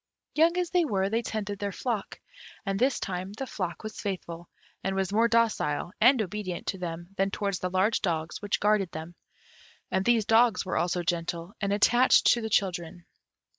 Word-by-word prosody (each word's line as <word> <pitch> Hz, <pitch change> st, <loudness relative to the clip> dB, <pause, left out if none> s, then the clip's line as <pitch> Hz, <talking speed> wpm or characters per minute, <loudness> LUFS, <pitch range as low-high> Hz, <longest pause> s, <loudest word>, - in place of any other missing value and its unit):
Young 330 Hz, +3 st, +3 dB
as 355 Hz, -2 st, -1 dB
they 360 Hz, -2 st, +3 dB
were, 195 Hz, -9 st, 0 dB
they 225 Hz, +1 st, +1 dB
tended 205 Hz, -3 st, -4 dB
their 200 Hz, -1 st, -2 dB
flock. 220 Hz, 0 st, -3 dB, 0.5 s
And 195 Hz, -1 st, -1 dB
this 260 Hz, +2 st, +2 dB
time 185 Hz, +1 st, -4 dB
the 270 Hz, +6 st, -5 dB
flock 185 Hz, -7 st, -5 dB
was 215 Hz, 0 st, -6 dB
faithful, 175 Hz, -4 st, -5 dB, 0.3 s
and 190 Hz, 0 st, -1 dB
was 195 Hz, 0 st, -1 dB
more 225 Hz, +2 st, +4 dB
docile 220 Hz, -9 st, +1 dB
and 250 Hz, +3 st, +6 dB
obedient 185 Hz, -2 st, -5 dB
to 190 Hz, -, -3 dB
them 170 Hz, 0 st, -5 dB
than 195 Hz, +1 st, +2 dB
towards 200 Hz, -2 st, -2 dB
the 180 Hz, -, -2 dB
large 190 Hz, +5 st, +1 dB
dogs 165 Hz, -2 st, -2 dB
which 205 Hz, -1 st, -1 dB
guarded 210 Hz, -3 st, +2 dB
them; 160 Hz, +2 st, -7 dB, 0.8 s
and 190 Hz, -, +1 dB
these 230 Hz, -1 st, +3 dB
dogs 225 Hz, -3 st, +4 dB
were 185 Hz, -, -2 dB
also 175 Hz, 0 st, 0 dB
gentle, 170 Hz, +1 st, -2 dB
and 200 Hz, -1 st, 0 dB
attached 240 Hz, +5 st, +4 dB
to 235 Hz, -, -2 dB
the 220 Hz, -, -3 dB
children. 175 Hz, -3 st, -1 dB
195 Hz, 185 wpm, -28 LUFS, 180-225 Hz, 0.8 s, and